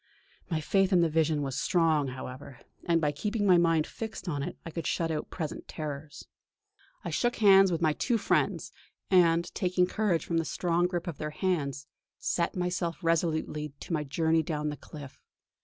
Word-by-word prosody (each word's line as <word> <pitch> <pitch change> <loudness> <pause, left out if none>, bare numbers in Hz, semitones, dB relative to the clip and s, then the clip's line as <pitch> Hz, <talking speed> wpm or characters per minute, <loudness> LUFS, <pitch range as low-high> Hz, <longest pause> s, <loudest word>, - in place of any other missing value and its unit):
My 160 -3 0
faith 195 +5 +2
in 180 -2 +5
the 170 - +3
vision 155 -2 +1
was 135 -2 -2
strong, 160 -5 +2
however, 130 0 -8 0.3
and 170 -1 +3
by 150 -2 +1
keeping 205 +8 -2
my 180 -3 +6
mind 165 -2 +3
fixed 220 -3 -7
on 145 -5 -2
it - - -5
I 165 - -6
could 165 0 -4
shut 165 -1 0
out 155 -1 -3
present 155 -4 -5
terrors. 145 -1 -7 0.8
I 170 - -3
shook 240 +10 +1
hands 195 -3 +6
with 170 0 -1
my 155 -1 +3
two 235 - 0
friends, 205 - 0 0.4
and, 170 -2 +4
taking 180 -1 +1
courage 185 -3 0
from 170 - -1
the - - 0
strong 175 +2 +1
grip 175 -1 -3
of 170 -6 -6
their 150 - -3
hands, 150 -5 -2 0.3
set 170 -1 -1
myself 180 -2 -1
resolutely 155 -3 0
to - - -5
my 155 -2 0
journey 160 +3 +1
down 150 -1 -2
the 150 - -4
cliff. 145 -2 -11
165 Hz, 185 wpm, -29 LUFS, 150-180 Hz, 0.8 s, my